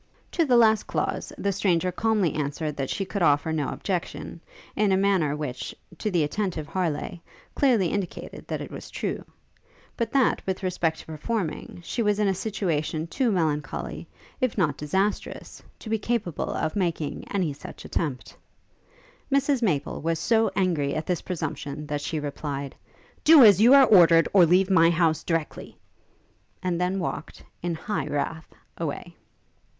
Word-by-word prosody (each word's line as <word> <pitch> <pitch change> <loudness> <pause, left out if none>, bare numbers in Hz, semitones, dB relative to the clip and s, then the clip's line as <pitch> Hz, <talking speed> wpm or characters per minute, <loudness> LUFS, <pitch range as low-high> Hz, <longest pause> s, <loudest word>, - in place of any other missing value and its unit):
To 335 - +2
the 250 -4 +4
last 220 -2 +4
clause, - - -2
the 200 - 0
stranger 185 -2 +1
calmly 210 -3 +1
answered 150 +1 -3
that 135 -2 -2
she 195 - -2
could 200 +1 -4
offer 150 0 +3
no 150 -4 -1
objection, 180 -4 -4 0.3
in 210 -2 +2
a 190 - +4
manner 190 -7 +2
which, 140 -5 -5 0.2
to 215 - -1
the 175 -5 +2
attentive 170 -1 -2
Harleigh, 175 0 -2 0.3
clearly 235 - +3
indicated 200 -4 -5
that - - -3
it - - -7
was - - -8
true; - - -3 0.7
but 230 -1 -2
that, 270 -3 +3
with 190 0 -2
respect 170 -3 -1
to - - -17
performing, 160 +2 -4
she 235 - -3
was 210 -2 +2
in 210 -1 +2
a 195 - +2
situation 175 -6 -2
too 240 +7 0
melancholy, 155 -5 -2 0.3
if 255 -5 0
not 155 -8 +2
disastrous, 190 +9 -2 0.2
to - - -12
be 220 0 0
capable 210 -7 -2
of 160 -1 -2
making 170 -6 -2
any 180 -7 -1
such 140 - -11
attempt. 140 -6 -3 1.0
Mrs 275 -1 +2
Maple 155 -11 0
was 165 +1 0
so 225 +7 +2
angry 165 -8 +1
at 155 0 -2
this 180 -2 -1
presumption, 150 -4 -4
that 145 -1 -3
she 155 +1 -2
replied, 140 -1 -4 0.5
'Do 315 -3 +9
as 205 -3 +7
you 245 +5 +8
are 275 -1 +8
ordered, 170 -7 +6
or 185 -4 +7
leave 185 +3 +3
my 165 -3 +6
house 165 -2 +2
directly!' 165 -3 -3 0.9
and 180 -1 -1
then 180 +2 0
walked, 180 - -5 0.2
in 175 -1 -2
high 205 +6 -3
wrath, 155 +2 -3 0.3
away. - - -4
175 Hz, 160 wpm, -26 LUFS, 155-205 Hz, 1.0 s, Do